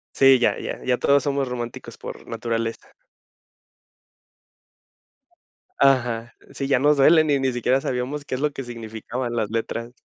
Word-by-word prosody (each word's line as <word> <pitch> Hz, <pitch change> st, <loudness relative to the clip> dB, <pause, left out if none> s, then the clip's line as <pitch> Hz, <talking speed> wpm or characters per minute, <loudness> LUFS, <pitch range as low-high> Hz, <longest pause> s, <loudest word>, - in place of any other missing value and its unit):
Sí, 135 Hz, -1 st, +6 dB
ya, 120 Hz, -, +1 dB
ya. -, -, -6 dB
Ya 125 Hz, -1 st, +1 dB
todos 140 Hz, 0 st, +3 dB
somos 140 Hz, -2 st, -1 dB
románticos 120 Hz, -1 st, -6 dB
por -, -, -9 dB
naturaleza. 115 Hz, 0 st, -4 dB, 2.8 s
Ajá. 120 Hz, -4 st, +2 dB, 0.2 s
Sí, 135 Hz, -1 st, -4 dB
ya 135 Hz, -, +3 dB
nos 145 Hz, +2 st, +3 dB
duelen 155 Hz, +2 st, +5 dB
y 140 Hz, -, +3 dB
ni 130 Hz, -1 st, +1 dB
siquiera 125 Hz, +2 st, +1 dB
sabíamos 135 Hz, +4 st, -3 dB
qué -, -, -4 dB
es 130 Hz, -, -3 dB
lo 150 Hz, -1 st, 0 dB
que 135 Hz, -, -6 dB
significaban 120 Hz, +1 st, -5 dB
las 110 Hz, -3 st, -1 dB
letras. 115 Hz, +1 st, -3 dB
125 Hz, 150 wpm, -23 LUFS, 115-140 Hz, 2.8 s, Sí